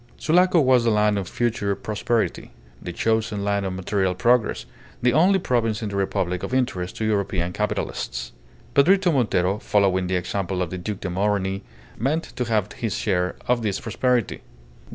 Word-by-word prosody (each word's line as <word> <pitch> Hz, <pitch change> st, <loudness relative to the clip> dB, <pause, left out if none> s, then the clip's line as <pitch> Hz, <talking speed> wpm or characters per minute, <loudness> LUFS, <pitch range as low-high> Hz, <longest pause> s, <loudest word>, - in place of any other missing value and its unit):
Sulaco 180 Hz, +2 st, +3 dB
was 130 Hz, -4 st, +4 dB
the 115 Hz, -, +2 dB
land 105 Hz, -1 st, +2 dB
of 95 Hz, -, -5 dB
future 110 Hz, -4 st, -1 dB
prosperity, 110 Hz, +3 st, -2 dB, 0.3 s
the 90 Hz, -, -5 dB
chosen 110 Hz, +1 st, 0 dB
land 100 Hz, -1 st, 0 dB
of 95 Hz, -, -3 dB
material 95 Hz, 0 st, -1 dB
progress, 120 Hz, +1 st, +2 dB, 0.3 s
the 125 Hz, -1 st, +2 dB
only 180 Hz, +7 st, +5 dB
province 115 Hz, -, 0 dB
in 105 Hz, -, -2 dB
the 100 Hz, -, -5 dB
Republic 90 Hz, -2 st, -1 dB
of 130 Hz, -, -3 dB
interest 95 Hz, -9 st, -1 dB
to 110 Hz, -, -2 dB
European 95 Hz, -4 st, 0 dB
capitalists. 105 Hz, +2 st, -3 dB, 0.4 s
Pedrito 180 Hz, +5 st, +4 dB
Montero, 100 Hz, -6 st, +1 dB
following 95 Hz, -4 st, +1 dB
the 95 Hz, -, 0 dB
example 90 Hz, 0 st, -2 dB
of 85 Hz, -, -6 dB
the 90 Hz, -, -4 dB
Duc 100 Hz, +2 st, -5 dB
de 95 Hz, -, -3 dB
Morny, 95 Hz, 0 st, 0 dB, 0.4 s
meant 150 Hz, +8 st, 0 dB
to 125 Hz, -, -1 dB
have 110 Hz, -3 st, 0 dB
his 110 Hz, -5 st, -3 dB
share 90 Hz, -3 st, 0 dB
of 120 Hz, -1 st, +2 dB
this 100 Hz, -3 st, -1 dB
prosperity. 120 Hz, 0 st, 0 dB
105 Hz, 170 wpm, -23 LUFS, 95-120 Hz, 0.4 s, only